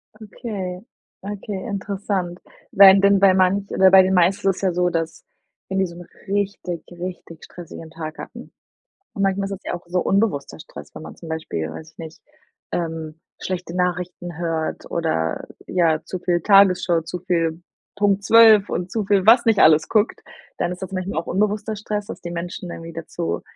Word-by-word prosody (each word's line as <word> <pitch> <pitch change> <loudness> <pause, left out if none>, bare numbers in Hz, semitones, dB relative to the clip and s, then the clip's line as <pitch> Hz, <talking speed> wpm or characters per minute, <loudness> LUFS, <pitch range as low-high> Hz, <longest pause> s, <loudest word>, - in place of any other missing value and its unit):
Okay, 205 -4 -6 0.4
okay, 200 -1 -6
interessant. 195 -3 -3 0.3
Wenn 195 0 +8
dann 200 0 +4
bei 195 -1 +6
manch 190 +2 +2
oder 190 0 +5
bei 190 0 +9
den 190 0 +1
meisten 185 +2 +3
ist 190 - +1
es - - -8
ja 190 -2 +1
so, 180 0 +1
dass 165 -1 -3 0.5
wenn 190 - -2
die 190 - +2
so 170 -2 -9
'n 175 0 -10 0.2
richtig, 195 -3 -2
richtig 175 -2 -8
stressigen 165 -2 -11
Tag 160 -1 -7
hatten. - - -10 0.6
Und 200 - -2
manchmal 195 0 +1
ist - - -8
es 195 0 -7
ja - - -3
auch 175 - -7
so 180 +1 0
unbewusster 175 - 0
Stress, - - -12
wenn - - -8
man - - -10
zum 165 - -11
Beispiel, 155 - -4
weiß 160 - -10
ich - - -42
nicht, 160 -1 -10 0.5
ähm, 160 -2 -4 0.2
schlechte 180 -2 -4
Nachrichten 180 -1 -3
hört 165 -2 -3
oder 80 - -2 0.2
ja, 165 -4 +2
zu 185 - -5
viel 175 -1 0
Tagesschau, 185 -3 +4
zu 170 +2 -6
viel 165 -2 -1 0.4
Punkt 200 -1 +2
12 220 -2 +6
und 180 +1 -3
zu 220 +2 -2
viel, 195 -1 +2
was 235 +2 +7
nicht 225 -2 +3
alles 155 0 +5
guckt, 215 0 +1 0.4
dann 175 - -1
ist 180 - -7
das 190 0 -6
manchmal 185 -3 -2
auch 165 - -7
unbewusster 210 +3 -1
Stress, 210 0 -4
dass - - -8
die 175 - -6
Menschen 175 +1 -6
irgendwie 165 0 -8
dazu, 85 - -4
180 Hz, 185 wpm, -21 LUFS, 165-200 Hz, 0.6 s, bei